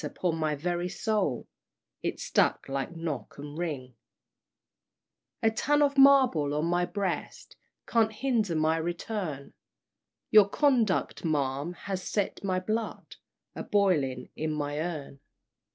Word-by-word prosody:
upon 175 -3 -2
my 155 -2 0
very 175 +4 -2
soul 195 - -1 0.5
It - - -3
struck - - +1
like 135 +5 -3
'Knock 155 -9 -5
and 145 +1 -8
Ring,'" 145 -7 -4 1.5
"A 225 - +4
ton 290 +6 +2
of 280 -1 +2
marble 260 - +5
on 150 +2 0
my 175 +1 +1
breast 195 -2 -4 0.3
Can't 225 -2 +2
hinder 220 -6 0
my 155 +1 +2
return; 170 -3 -4 0.8
Your 210 -2 +7
conduct, 245 -7 +1
ma'am, 145 0 -1
has 190 -2 -2
set 200 +2 -2
my 185 -2 0
blood 215 +4 -4 0.4
A - - -5
boiling 150 -11 +1
in 155 0 -2
my 145 -1 -2
urn!" 155 -4 -5
175 Hz, 125 wpm, -28 LUFS, 150-210 Hz, 1.5 s, Your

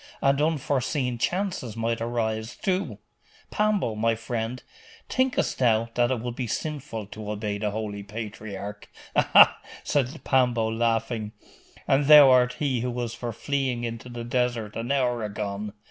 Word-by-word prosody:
And 140 +1 +2
unforeseen 140 -4 0
chances 175 - -2
might 115 0 -1
arise, 110 -1 -2
too.... 185 - -2 0.5
Pambo, 210 - +1
my 115 +2 +1
friend, 115 +1 -4 0.4
thinkest 260 0 0
thou 115 -2 +3
that 120 0 +2
it 130 -3 -1
would 120 0 -4
be 125 -2 -3
sinful 135 -4 -4
to 105 +1 -8
obey 105 -1 -3
the 105 0 0
Holy 105 -1 -4
Patriarch?' 105 -1 -7 0.3
'Aha!' - - +6 0.2
said 135 -2 -1
Pambo, 125 -4 +2
laughing, 115 -1 -1 0.5
'and 135 +1 +3
thou 145 -3 +10
art 125 -1 +4
he 135 -5 -1
who 125 +2 -2
was 120 -2 -3
for 120 0 -5
fleeing 130 0 -2
into 115 +1 -5
the 120 -1 -6
desert 120 -3 -1
an 115 +3 -3
hour 125 -4 +1
agone! 105 0 -4
120 Hz, 145 wpm, -26 LUFS, 110-130 Hz, 0.5 s, thou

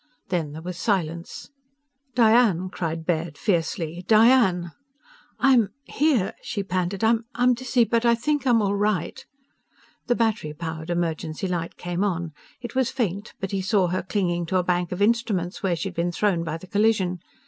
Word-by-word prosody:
Then 165 -5 -1
there 160 +1 -8
was 180 0 -6
silence. 170 - -2 0.6
"Diane!" 220 -6 +4
cried 165 -2 -4
Baird 165 -3 -1
fiercely. 170 -1 -1
"Diane!" 215 -6 +4 0.7
"I'm... 245 -7 +4
here," 275 -11 +1
she 200 - -3
panted. 185 +1 -2
"I'm 235 +2 +2
dizzy, 245 0 +1
but 230 0 +1
I... 235 -1 +4
think 290 +4 -1
I'm 230 -3 +4
all 200 0 +1
right 205 -3 -1 0.4
" - - -34
The 245 - +2
battery 215 -10 -1
powered 160 0 -6
emergency 165 0 -2
light 170 -2 -3
came 175 +2 -2
on. 170 -5 -2 0.3
It 240 - -7
was 260 -2 +1
faint, 205 -5 -3
but 195 - -4
he 195 -1 -1
saw 190 -2 +2
her 185 +2 -1
clinging 175 -3 -1
to 185 - +1
a 180 - +2
bank 175 -1 0
of 180 +3 0
instruments 210 -5 0
where 185 -3 +1
she'd 185 +3 -4
been 175 +1 -1
thrown 175 -2 +1
by 165 -1 -3
the 165 - -12
collision. 200 -3 +1
185 Hz, 170 wpm, -24 LUFS, 170-225 Hz, 0.7 s, Diane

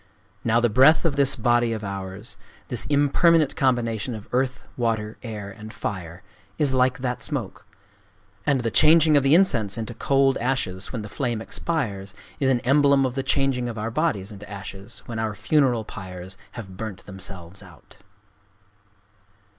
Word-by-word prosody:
Now 115 0 +3
the 120 - +3
breath 135 +10 +5
of 155 -4 +1
this 140 -1 +3
body 120 0 +2
of 110 -1 -5
ours,—this 100 +5 -5
impermanent 150 +2 +3
combination 120 -3 0
of 105 - -10
Earth, 130 0 -1
Water, 110 -3 -2
Air, 105 -4 -6
and 110 +1 -10
Fire,—is 100 - -4
like 130 0 +3
that 125 -2 -3
smoke. 120 -12 -4 0.8
And 140 -3 +2
the 115 -1 -1
changing 155 +3 +5
of 145 - +6
the 135 +3 +4
incense 115 - +3
into 115 +1 -4
cold 135 +2 +2
ashes 115 -7 -2
when 115 -4 -4
the - - -6
flame 120 +1 -2
expires 105 - -3 0.2
is 135 - +2
an 125 -2 +2
emblem 140 +1 +4
of 130 - -2
the 135 - -1
changing 135 -2 0
of 115 - -6
our 110 +2 -3
bodies 115 - -1
into 105 0 -11
ashes 100 +2 -8
when 115 -2 -5
our 110 -1 -2
funeral 125 -2 +2
pyres 95 0 -8 0.2
have 95 -6 -9
burnt 110 -3 -6
themselves 95 -2 -8
out." 90 -8 -17
115 Hz, 155 wpm, -24 LUFS, 100-135 Hz, 0.8 s, of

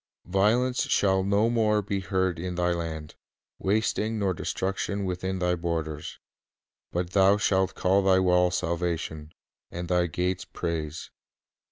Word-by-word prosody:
"Violence 110 +7 +2
shall 95 -1 +3
no 100 +3 +2
more 110 -3 +2
be 100 0 -2
heard 95 -1 -1
in 90 +1 -4
thy 90 0 +1
land, 80 -3 -4 0.5
Wasting 110 +2 0
nor 100 -3 +1
destruction 95 +3 -2
within 95 +1 -2
thy 90 -1 +1
borders; 80 -3 -3 0.7
But 90 0 -2
thou 100 +1 +5
shalt 95 -2 +1
call 95 +2 +3
thy 95 -1 +4
walls 90 -1 +3
Salvation, 85 -3 -3 0.4
And 85 0 -6
thy 90 -1 +2
gates 90 +3 -1
Praise." 80 -2 -4
90 Hz, 135 wpm, -27 LUFS, 85-100 Hz, 0.7 s, thou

